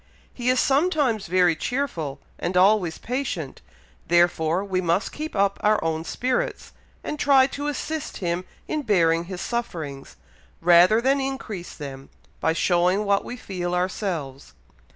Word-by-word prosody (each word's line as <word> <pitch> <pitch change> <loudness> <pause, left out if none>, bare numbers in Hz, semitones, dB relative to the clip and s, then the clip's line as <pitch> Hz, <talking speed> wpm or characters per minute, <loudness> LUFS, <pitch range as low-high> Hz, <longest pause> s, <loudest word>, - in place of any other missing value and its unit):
He 245 0 -1
is 255 0 +3
sometimes 275 - +2
very 180 -1 +3
cheerful, 165 - -3 0.2
and 180 +1 -1
always 185 -3 +4
patient, 240 - -4 0.5
therefore 175 +1 +2
we 185 -2 -1
must 175 +3 0
keep 310 -3 -6
up 200 0 +1
our 210 0 +4
own 160 0 -1
spirits, 260 - -2 0.3
and 300 - -4
try 275 -3 +5
to 285 +2 -4
assist 310 +1 -4
him 175 -1 -2 0.2
in 305 - -1
bearing 170 - +2
his 180 0 -6
sufferings, 160 - -5 0.4
rather 180 +6 +6
than 270 +2 +2
increase 245 -9 -5
them, 135 -2 -8 0.3
by 160 - +2
showing 180 +4 +2
what 200 0 +2
we 245 - -7
feel 180 -5 -3
ourselves. 180 -7 -3
185 Hz, 140 wpm, -24 LUFS, 170-250 Hz, 0.5 s, rather